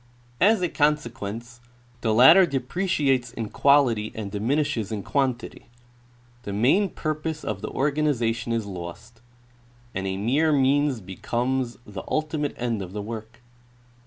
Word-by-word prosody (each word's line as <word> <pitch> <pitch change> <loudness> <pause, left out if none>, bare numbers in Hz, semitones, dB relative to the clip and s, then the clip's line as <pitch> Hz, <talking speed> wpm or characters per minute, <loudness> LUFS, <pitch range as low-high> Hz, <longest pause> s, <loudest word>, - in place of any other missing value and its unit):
As 205 0 +4
a - - +3
consequence 120 -7 -2 0.4
the 110 - +1
latter 160 - +8
depreciates 135 -3 0
in 115 -3 -4
quality 125 -7 +3
and 105 -3 -5
diminishes 115 0 -1
in 105 -3 -3
quantity; 130 -4 -2 0.7
the 100 - -6
main 135 - +3
purpose 155 0 -4
of 100 -2 -4
the - - -4
organization 135 -6 0
is 115 -2 -1
lost, 100 +5 -9 0.7
and 95 +1 -3
a 95 0 -2
mere 140 +10 +2
means 140 -2 +2
becomes 120 +6 -2
the 100 -2 -7
ultimate 155 -1 -1
end 120 -4 -2
of 95 -1 -7
the 105 - -4
work. 110 +2 -8
120 Hz, 130 wpm, -25 LUFS, 110-145 Hz, 0.7 s, latter